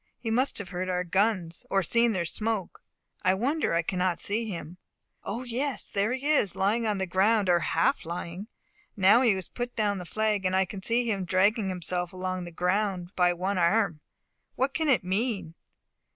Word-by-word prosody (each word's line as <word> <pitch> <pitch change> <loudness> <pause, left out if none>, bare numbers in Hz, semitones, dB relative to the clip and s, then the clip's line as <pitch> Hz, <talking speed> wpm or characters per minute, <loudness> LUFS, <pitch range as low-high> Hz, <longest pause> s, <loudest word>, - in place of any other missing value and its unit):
He 225 - -4
must 255 +4 +1
have 205 -4 -5
heard 185 0 -3
our 180 0 0
guns, 185 -2 0
or 195 -1 +2
seen 235 +6 +2
their 180 -3 -1
smoke. 215 +2 -2 0.4
I 185 +1 +3
wonder 270 - 0
I 170 - +2
cannot 180 0 0
see 215 +6 -1
him. 175 -1 -7 0.4
O, 230 +5 -4
yes, 255 +3 -2
there 205 +3 +1
he 260 +2 -4
is, 290 - +2
lying 220 +4 +1
on 210 -2 0
the 190 - -1
ground, 195 +2 +2
or 175 -1 +5
half 165 0 +1
lying. 170 +4 -6 0.5
Now 200 +5 +6
he 235 -5 +4
has 190 -2 -4
put 245 0 -5
down 205 -3 0
the 180 - -7
flag, 215 +1 0
and 185 0 +1
I 190 0 +3
can 190 +1 -8
see 235 +4 +1
him 200 -4 0
dragging 195 +4 +2
himself 180 -1 -3
along 185 -1 -3
the 175 - -8
ground 180 +1 -1
by 180 -1 +4
one 185 +2 -1
arm. 175 -2 +2 0.6
What 265 +2 0
can 315 -1 0
it 235 -10 +3
mean? 195 -2 -2
195 Hz, 195 wpm, -27 LUFS, 180-225 Hz, 0.6 s, Now